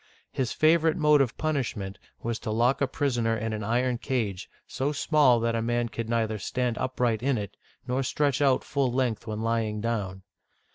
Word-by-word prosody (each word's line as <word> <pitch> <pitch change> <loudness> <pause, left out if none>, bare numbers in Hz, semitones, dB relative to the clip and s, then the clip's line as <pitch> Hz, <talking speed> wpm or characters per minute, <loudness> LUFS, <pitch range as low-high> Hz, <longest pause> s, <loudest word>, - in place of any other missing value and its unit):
Hisf 130 -3 -2 0.2
avorite 160 -1 +2
mode 150 -3 +4
of 130 -3 -1
punishment 120 -11 -2 0.2
was 115 -1 -2
to - - -5
lock 120 +6 +2
a 140 - +3
pris 130 -2 -1
oner 115 -1 +1
in 110 +1 -3
an 110 -1 -4
iron 120 +3 0
cage, 105 -9 -2 0.2
so 135 +3 -2
small 145 -4 +3
that 115 0 +1
a 115 - 0
man 120 +1 0
could 115 0 -5
neither 110 -2 0
stand 125 +4 -1
upright 125 -4 0
in 135 0 +1
it, 100 -1 -5 0.3
nor 125 +1 0
stretch 140 +1 0
out 135 -3 +3
full 140 -3 0
length 125 -3 -1
when 110 0 -3
lying 115 -2 0
down. 100 -4 -3
120 Hz, 190 wpm, -27 LUFS, 110-130 Hz, 0.3 s, mode